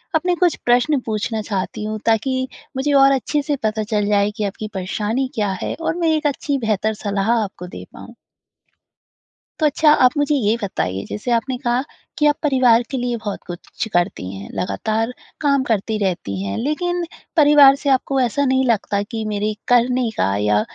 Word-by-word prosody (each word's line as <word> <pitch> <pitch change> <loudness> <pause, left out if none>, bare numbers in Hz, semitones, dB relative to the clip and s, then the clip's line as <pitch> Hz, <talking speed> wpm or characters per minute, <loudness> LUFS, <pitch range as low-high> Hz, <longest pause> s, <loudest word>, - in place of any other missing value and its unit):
अपने 355 +3 +2
कुछ 350 0 +2
प्रश्न 250 +4 +3
पूछना 220 0 -2
चाहती 205 +1 -4
हूँ, 215 0 -3
ताकि 260 +4 +1 0.3
मुझे 285 +2 0
और 275 0 +6
अच्छे 280 +3 0
से 290 0 -1
पता 215 0 0
चल 210 -1 -1
जाए 205 0 +2
कि 215 - -2
आपकी 210 +2 -4
परेशानी 210 +7 -2
क्या 205 -3 0
है? - - -2
और 325 - -1
मैं 335 -2 +1
एक 300 -1 0
अच्छी 285 0 -1
बेहतर 220 -2 0
सलाह 205 +1 -1
आपको 200 -5 -3
दे - - -9
पाऊँ? - - -12 1.5
तो 310 - +4
अच्छा 300 +1 +4
आप 250 +3 +4
मुझे 290 0 +2
ये 225 -4 +2
बताइए 95 - -2
जैसे 225 +4 -4
आपने 250 +2 0
कहा 245 -1 0 0.4
कि 300 - +3
आप 295 - +5
परिवार 255 -5 +4
के 270 - -2
लिए 245 -1 -1
बहुत 210 -3 -5
कुछ 175 +4 -6
करती 175 - 0
हैं, 95 - -8
लगातार 215 - -1 0.3
काम 280 -3 +2
करती 220 0 0
रहती 170 - -2
हैं, 100 0 -3
लेकिन 350 +6 -1 0.3
परिवार 290 -2 +7
से - - +1
आपको 265 +1 +1
ऐसा 255 +4 +1
नहीं 260 0 +2
लगता 205 -3 +1
कि 220 +1 -5
मेरे 210 +1 -1
करने 245 0 +3
का 95 +1 +1
या 105 0 +2
230 Hz, 180 wpm, -20 LUFS, 205-275 Hz, 1.5 s, परिवार